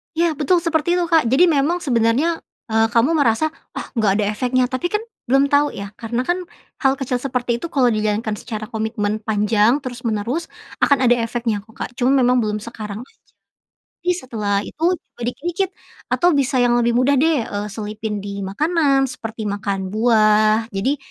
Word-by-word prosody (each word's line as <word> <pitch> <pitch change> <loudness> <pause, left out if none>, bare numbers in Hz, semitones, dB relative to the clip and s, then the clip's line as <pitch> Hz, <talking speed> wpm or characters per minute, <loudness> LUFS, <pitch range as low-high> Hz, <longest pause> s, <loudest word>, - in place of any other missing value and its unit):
Ya, 335 +1 +2
betul 340 +3 +2
seperti 335 0 +1
itu 355 - +1
Kak. 320 -6 +4
Jadi, 265 +9 +4
memang 315 +4 +1
sebenarnya, 255 +6 +1 0.3
eee, 225 0 +3
kamu 235 +5 +4
merasa, 285 +3 +2 0.2
"Ah, - - -5
enggak 210 -3 +3
ada 210 0 +1
efeknya," 250 +4 +1
tapi 260 +6 -2
kan 420 +4 -1 0.2
belum 275 +3 +3
tahu 290 +1 +3
ya, 200 0 -6
karena 235 +1 -2
kan 350 +7 0 0.4
hal 270 -3 +3
kecil 255 -2 -1
seperti 245 -2 -2
itu 335 - -5
kalau 270 -7 +2
dijalankan 215 0 -1
secara 215 -2 -6
komitmen 215 -1 -2
panjang 215 +4 +2
terus-menerus, 245 +3 -3 0.3
akan 280 - +3
ada 245 0 +4
efeknya 230 -1 -1
kok, 220 - -19
Kak. - - -5
Cuma, 255 +2 +3
memang 250 -2 +4
belum 210 -2 -1
sekarang 215 -2 -7
aja. 265 - -17 0.9
Tapi 355 - +1
setelah 220 - -3
itu, 315 - -11 0.2
coba 320 - -25
dikit-dikit 345 +9 -2 0.4
atau 350 -2 +3
bisa 275 -1 +1
yang 245 -1 +3
lebih 235 0 +1
mudah 255 +3 +3
deh, 305 -5 +2
eee, 205 0 -4
selipin 210 +1 -4
di 200 0 -5
makanan, 275 - +1
seperti 225 -3 -6
makan 200 -2 -3
buah. 215 -1 +4
Jadi, 210 +9 0
240 Hz, 175 wpm, -20 LUFS, 215-280 Hz, 0.9 s, Kak